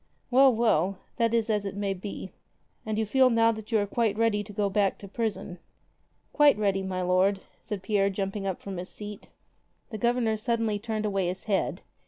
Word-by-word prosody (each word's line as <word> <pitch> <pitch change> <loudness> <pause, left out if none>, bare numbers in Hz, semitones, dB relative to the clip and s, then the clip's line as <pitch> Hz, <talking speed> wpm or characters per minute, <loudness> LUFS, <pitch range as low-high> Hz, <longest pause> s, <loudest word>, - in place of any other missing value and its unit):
Well, 265 +1 +7
well, 195 -5 +2 0.2
that 230 -2 +2
is 230 -1 +1
as 210 -2 0
it 195 -1 -5
may 200 -1 -1
be. 190 0 -7 0.6
And 215 -1 -1
you 220 - +1
feel 260 +4 +4
now 230 -1 +4
that 220 +1 -8
you 225 - +4
are 205 - +1
quite 215 0 0
ready 225 -2 +2
to 205 - -11
go 205 0 0
back 200 -1 +1
to 200 - -10
prison?" 205 -4 -3 0.7
"Quite 295 -4 +5
ready, 200 -2 +1
my 185 -1 -3
lord," 185 +2 +2 0.2
said 200 -3 -6
Pierre 200 -1 +2
jumping 195 0 -3
up 190 - -2
from 195 -2 -7
his 180 +2 -6
seat. 210 -1 -8 0.6
The 215 - -5
Governor 235 -1 +1
suddenly 225 -2 0
turned 215 0 -3
away 195 -3 0
his 185 +1 -4
head. 200 -3 -1
210 Hz, 200 wpm, -27 LUFS, 195-225 Hz, 0.7 s, Well